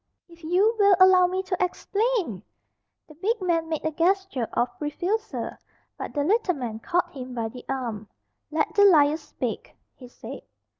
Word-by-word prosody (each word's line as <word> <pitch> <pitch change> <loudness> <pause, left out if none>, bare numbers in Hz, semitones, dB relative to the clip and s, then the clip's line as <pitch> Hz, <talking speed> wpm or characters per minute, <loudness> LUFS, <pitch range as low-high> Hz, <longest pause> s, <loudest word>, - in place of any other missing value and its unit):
"If 335 -1 -18
you 380 +8 +2
will 400 -1 +6
allow 370 -1 +7
me 375 +1 -2
to 370 -1 -1
explain!" 395 - -1 0.7
The 305 - -14
big 410 +9 -1
man 335 -3 0
made 315 -1 -3
a 315 - +1
gesture 345 - 0
of 240 - +2
refusal. 365 +9 -2 0.4
But - - -7
the 290 - +1
little 380 +1 +2
man 235 -5 -5
caught 350 +7 -1
him 255 -2 -7
by 225 -2 -2
the 250 +2 -11
arm. 235 -6 -3 0.4
"Let 315 0 -1
the 405 - +5
liar 310 -6 +6
speak," - - -6 0.2
he 250 - -13
said. 245 - -9
340 Hz, 165 wpm, -25 LUFS, 275-380 Hz, 0.7 s, allow